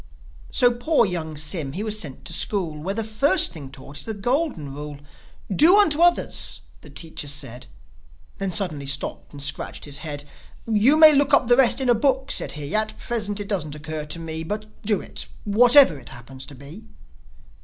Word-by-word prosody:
So 245 Hz, -1 st, +3 dB
poor 240 Hz, +2 st, +2 dB
young 160 Hz, -5 st, -4 dB
Sym, 150 Hz, -2 st, -1 dB
he 200 Hz, -, -4 dB
was 215 Hz, -1 st, -2 dB
sent 145 Hz, -9 st, -7 dB
to 170 Hz, -, -5 dB
school, 180 Hz, -3 st, -1 dB
Where 195 Hz, +5 st, -3 dB
the 225 Hz, -, -2 dB
first 275 Hz, -, +3 dB
thing 145 Hz, -5 st, -9 dB
taught 135 Hz, +2 st, -10 dB
is -, -, -8 dB
the 220 Hz, -, -4 dB
Golden 230 Hz, -, -2 dB
Rule. 145 Hz, 0 st, -8 dB, 0.6 s
"Do 345 Hz, -, +6 dB
unto 325 Hz, -7 st, +3 dB
others," 345 Hz, 0 st, +3 dB, 0.2 s
the -, -, -14 dB
teacher 160 Hz, -3 st, -4 dB
said... 125 Hz, -3 st, -4 dB, 0.7 s
Then 195 Hz, -1 st, -2 dB
suddenly 160 Hz, -8 st, -2 dB
stopped 140 Hz, +1 st, -4 dB
and 140 Hz, -1 st, -8 dB
scratched 145 Hz, -, -4 dB
his 145 Hz, -1 st, -4 dB
head. 145 Hz, -2 st, -6 dB, 0.4 s
"You 230 Hz, +7 st, +3 dB
may 315 Hz, -1 st, +8 dB
look 285 Hz, 0 st, +4 dB
up 245 Hz, -, 0 dB
the 245 Hz, -, +6 dB
rest 265 Hz, 0 st, +4 dB
in 265 Hz, -, 0 dB
a 240 Hz, -, +5 dB
book," 265 Hz, +3 st, 0 dB
said -, -, 0 dB
he. 145 Hz, 0 st, -6 dB
"At 215 Hz, 0 st, 0 dB
present 210 Hz, -3 st, -2 dB
it 205 Hz, -, -5 dB
doesn't 155 Hz, -8 st, 0 dB
occur 155 Hz, 0 st, -5 dB
to 150 Hz, -, -2 dB
me; 160 Hz, -1 st, -4 dB
But 210 Hz, +6 st, -5 dB, 0.2 s
do 205 Hz, -2 st, 0 dB
it, -, -, -5 dB, 0.2 s
whatever 235 Hz, -, +6 dB
it 120 Hz, -, -11 dB
happens 130 Hz, +2 st, -10 dB
to 145 Hz, -, -11 dB
be." 140 Hz, -, -12 dB
195 Hz, 195 wpm, -23 LUFS, 150-240 Hz, 0.7 s, may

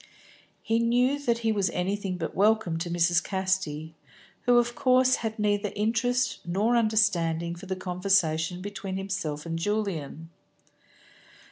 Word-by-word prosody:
He 225 Hz, +1 st, +1 dB
knew 245 Hz, +4 st, +2 dB
that 240 Hz, -5 st, 0 dB
he 225 Hz, -, +3 dB
was 200 Hz, -4 st, +1 dB
anything 190 Hz, +1 st, -2 dB
but 165 Hz, -2 st, -4 dB
welcome 205 Hz, -5 st, +2 dB
to 170 Hz, +1 st, -3 dB
Mrs. 170 Hz, 0 st, +2 dB
Casti, 185 Hz, -5 st, -2 dB, 0.5 s
who 245 Hz, 0 st, +6 dB
of 240 Hz, 0 st, +2 dB
course 255 Hz, +1 st, +3 dB
had 220 Hz, -1 st, -4 dB
neither 205 Hz, -1 st, 0 dB
interest 240 Hz, +4 st, 0 dB
nor 200 Hz, +7 st, +1 dB
understanding 180 Hz, -7 st, +1 dB
for 175 Hz, +3 st, -10 dB
the 190 Hz, -, -2 dB
conversation 180 Hz, -2 st, 0 dB
between 195 Hz, -1 st, -5 dB
himself 185 Hz, -6 st, -4 dB
and 165 Hz, 0 st, -3 dB
Julian. 165 Hz, -6 st, -3 dB
195 Hz, 135 wpm, -27 LUFS, 170-220 Hz, 0.5 s, who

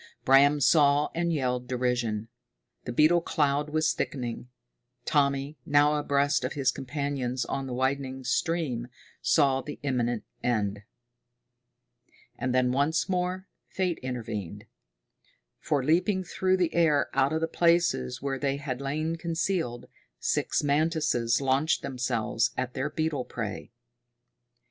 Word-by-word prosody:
Bram 140 Hz, +2 st, +6 dB
saw 145 Hz, 0 st, +4 dB
and 170 Hz, 0 st, 0 dB
yelled 125 Hz, -5 st, -1 dB
derision. 120 Hz, -4 st, -1 dB, 0.6 s
The 120 Hz, -, -3 dB
beetle 155 Hz, +7 st, +4 dB
cloud 145 Hz, -2 st, 0 dB
was 155 Hz, +1 st, +1 dB
thickening. 125 Hz, -2 st, -4 dB, 0.6 s
Tommy, 140 Hz, 0 st, +1 dB
now 145 Hz, +2 st, +4 dB
abreast 145 Hz, -2 st, +1 dB
of 130 Hz, -, -2 dB
his 140 Hz, -3 st, +1 dB
companions 135 Hz, -2 st, -3 dB
on 135 Hz, -1 st, -3 dB
the 125 Hz, -, -5 dB
widening 130 Hz, 0 st, -1 dB
stream, 135 Hz, -5 st, -1 dB, 0.3 s
saw 135 Hz, -4 st, +3 dB
the 145 Hz, +2 st, -8 dB
imminent 120 Hz, -5 st, -1 dB, 0.2 s
end. 105 Hz, -4 st, -1 dB, 1.5 s
And 130 Hz, -, -2 dB
then 125 Hz, 0 st, +2 dB
once 145 Hz, +7 st, +1 dB
more 185 Hz, +1 st, -1 dB, 0.2 s
fate 180 Hz, -3 st, -2 dB
intervened. 115 Hz, -8 st, -5 dB, 0.9 s
For, 145 Hz, -4 st, 0 dB
leaping 180 Hz, +6 st, +2 dB
through 185 Hz, +2 st, 0 dB
the 175 Hz, -3 st, 0 dB
air 155 Hz, -4 st, +2 dB
out 135 Hz, +1 st, +2 dB
of 160 Hz, -, 0 dB
the 165 Hz, -, +1 dB
places 170 Hz, -, +1 dB
where 135 Hz, -1 st, -2 dB
they 140 Hz, 0 st, 0 dB
had 140 Hz, -3 st, -4 dB
lain 155 Hz, +4 st, -2 dB
concealed, 165 Hz, -7 st, -2 dB, 0.3 s
six -, -, 0 dB
mantises 145 Hz, -5 st, +1 dB
launched 135 Hz, +4 st, +1 dB
themselves 120 Hz, -3 st, -1 dB
at 130 Hz, -1 st, -2 dB
their 140 Hz, -, -2 dB
beetle 155 Hz, -4 st, -1 dB
prey. 110 Hz, -4 st, -5 dB
140 Hz, 125 wpm, -28 LUFS, 125-155 Hz, 1.5 s, Bram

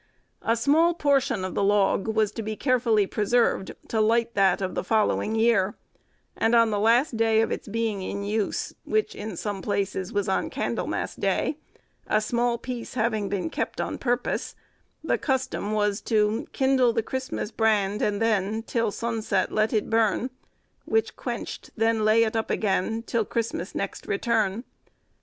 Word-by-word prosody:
A 230 Hz, -, +1 dB
small 315 Hz, +8 st, +3 dB
portion 275 Hz, -, +1 dB
of 185 Hz, -, -4 dB
the -, -, 0 dB
log 200 Hz, 0 st, +2 dB
was 220 Hz, -1 st, +1 dB
to 225 Hz, -, -5 dB
be 215 Hz, 0 st, -4 dB
carefully 230 Hz, -5 st, +2 dB
preserved 215 Hz, 0 st, +1 dB
to 220 Hz, -, +1 dB
light 230 Hz, +2 st, +2 dB
that 195 Hz, -3 st, +3 dB
of 190 Hz, -1 st, -2 dB
the -, -, -2 dB
following 215 Hz, +2 st, +1 dB
year; 220 Hz, -4 st, +3 dB, 0.6 s
and 225 Hz, +1 st, +2 dB
on 230 Hz, -1 st, +5 dB
the 205 Hz, -, 0 dB
last 230 Hz, +4 st, +3 dB
day 225 Hz, -1 st, +3 dB
of 225 Hz, -, +1 dB
its -, -, -4 dB
being 220 Hz, -2 st, -1 dB
in 200 Hz, +2 st, -4 dB
use, 210 Hz, 0 st, -2 dB
which, 435 Hz, 0 st, 0 dB
in 210 Hz, -, -6 dB
some 205 Hz, 0 st, -3 dB
places, 195 Hz, -2 st, -2 dB
was 205 Hz, -1 st, -1 dB
on 190 Hz, -, 0 dB
Candlemas -, -, -2 dB
Day, 295 Hz, -, -1 dB, 0.5 s
a 215 Hz, -, +3 dB
small 235 Hz, +2 st, 0 dB
piece 245 Hz, 0 st, -6 dB
having 220 Hz, -4 st, 0 dB
been 200 Hz, -, -2 dB
kept -, -, -3 dB
on -, -, -3 dB
purpose, 245 Hz, -1 st, -1 dB, 0.5 s
the -, -, 0 dB
custom 260 Hz, -6 st, -1 dB
was 210 Hz, -1 st, 0 dB
to— 215 Hz, 0 st, +1 dB
"Kindle 265 Hz, -3 st, +3 dB
the 225 Hz, -1 st, 0 dB
Christmas 260 Hz, -3 st, -4 dB
brand, 210 Hz, -3 st, +1 dB
and 205 Hz, -1 st, 0 dB
then 220 Hz, -1 st, 0 dB
Till 230 Hz, -1 st, 0 dB
sunne 230 Hz, +2 st, -3 dB
set 195 Hz, -3 st, 0 dB
let 215 Hz, +1 st, +1 dB
it 215 Hz, -2 st, 0 dB
burne; 225 Hz, +2 st, +1 dB, 0.5 s
Which 445 Hz, 0 st, 0 dB
quencht, -, -, -5 dB
then 225 Hz, 0 st, +2 dB
lay 215 Hz, +2 st, +5 dB
it 220 Hz, 0 st, -1 dB
up 225 Hz, -, -1 dB
agen, 220 Hz, +2 st, 0 dB
Till 230 Hz, -1 st, 0 dB
Christmas 220 Hz, -5 st, -3 dB
next 195 Hz, -, -4 dB
returne. 220 Hz, 0 st, 0 dB
220 Hz, 170 wpm, -26 LUFS, 205-235 Hz, 0.6 s, on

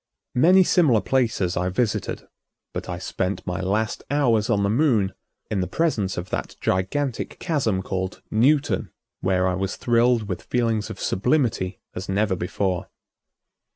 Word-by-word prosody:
Many 180 Hz, +9 st, +6 dB
similar 155 Hz, -, +4 dB
places 110 Hz, -6 st, +1 dB
I 90 Hz, +1 st, 0 dB
visited, 105 Hz, +3 st, -1 dB, 0.5 s
but -, -, -5 dB
I 90 Hz, -, -3 dB
spent 95 Hz, +2 st, -3 dB
my 90 Hz, +1 st, -2 dB
last 105 Hz, +4 st, -1 dB
hours 125 Hz, -7 st, +2 dB
on 100 Hz, -3 st, +2 dB
the -, -, +2 dB
Moon 115 Hz, -7 st, +2 dB, 0.4 s
in 100 Hz, -3 st, +1 dB
the 90 Hz, -, -1 dB
presence 105 Hz, -, 0 dB
of 90 Hz, +2 st, -5 dB
that -, -, -3 dB
gigantic 115 Hz, +9 st, -1 dB
chasm 120 Hz, -, 0 dB
called 95 Hz, 0 st, -4 dB
Newton, 140 Hz, +7 st, +2 dB, 0.3 s
where 95 Hz, 0 st, +1 dB
I 90 Hz, -, +1 dB
was 95 Hz, +1 st, -2 dB
thrilled 120 Hz, -2 st, +2 dB
with 90 Hz, -, -3 dB
feelings 115 Hz, -3 st, 0 dB
of -, -, -7 dB
sublimity 115 Hz, -5 st, 0 dB
as 95 Hz, +2 st, -6 dB
never 100 Hz, 0 st, +1 dB
before. 90 Hz, 0 st, -2 dB
105 Hz, 150 wpm, -24 LUFS, 95-125 Hz, 0.5 s, Many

